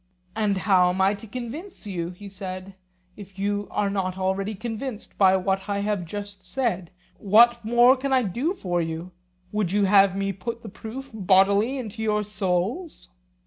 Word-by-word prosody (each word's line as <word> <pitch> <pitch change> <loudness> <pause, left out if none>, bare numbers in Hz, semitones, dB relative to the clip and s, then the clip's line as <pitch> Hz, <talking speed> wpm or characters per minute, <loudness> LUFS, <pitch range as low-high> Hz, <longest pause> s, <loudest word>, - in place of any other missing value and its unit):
And 210 -3 +1
how 185 -2 +4
am 180 +1 -2
I 190 +1 +4
to 205 +2 -9
convince 255 - -7
you, 175 -4 -3
he 185 +3 -10
said, 190 0 -7 0.4
if 195 -2 -12
you 205 +1 -1
are 200 -1 0
not 190 -2 -2
already 195 +2 -1
convinced 225 +2 -6
by 190 -1 +6
what 190 +1 -1
I 200 - 0
have 205 -3 -1
just 200 +2 -7
said; 190 -5 -2 0.3
what 235 +4 +5
more 240 +3 +6
can 275 +1 -3
I 260 -1 +4
do 250 - -1
for 175 - -1
you? 165 +2 -4 0.4
Would 210 -4 -1
you 205 0 +3
have 195 -1 +5
me 195 0 -1
put 230 +5 -6
the 220 - -7
proof 235 +7 -8
bodily 200 +5 +3
into 225 -3 -6
your 210 -1 +1
souls? 210 - -2
205 Hz, 175 wpm, -25 LUFS, 190-225 Hz, 0.4 s, by